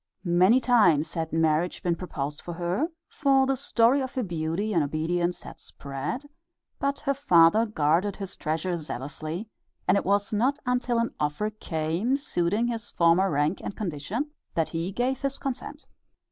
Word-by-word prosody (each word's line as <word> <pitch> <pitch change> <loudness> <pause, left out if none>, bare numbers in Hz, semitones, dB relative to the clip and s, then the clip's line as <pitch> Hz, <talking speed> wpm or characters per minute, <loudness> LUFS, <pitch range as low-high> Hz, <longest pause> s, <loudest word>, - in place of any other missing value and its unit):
Many 185 +8 +5
times 205 - +3
had 160 -2 -3
marriage 160 +1 +1
been 175 -1 +1
proposed 150 -5 -5
for 175 - -6
her, 180 - 0 0.2
for 270 -3 +3
the 270 0 +1
story 255 0 +3
of 260 0 -5
her 255 - 0
beauty 175 +3 -2
and 170 - +3
obedience 170 +4 -1
had - - -10
spread, 140 - -5 0.5
but 280 0 0
her 280 -2 +1
father 215 -5 +5
guarded 180 +1 +1
his 195 -2 -6
treasure 165 +3 -2
zealously, 155 - -5 0.4
and - - +5
it 200 - +1
was 200 +2 +1
not 255 +7 +2
until 250 -1 +1
an 230 0 0
offer 150 +9 -1
came, 175 +4 -1
suiting 210 -6 0
his 235 -1 -3
former 170 +3 +3
rank 150 +3 0
and - - -5
condition, 205 - -3 0.2
that 165 -1 +1
he 165 +3 -3
gave 250 +5 -1
his 275 0 -2
consent. 275 +3 -5
185 Hz, 160 wpm, -27 LUFS, 165-240 Hz, 0.5 s, Many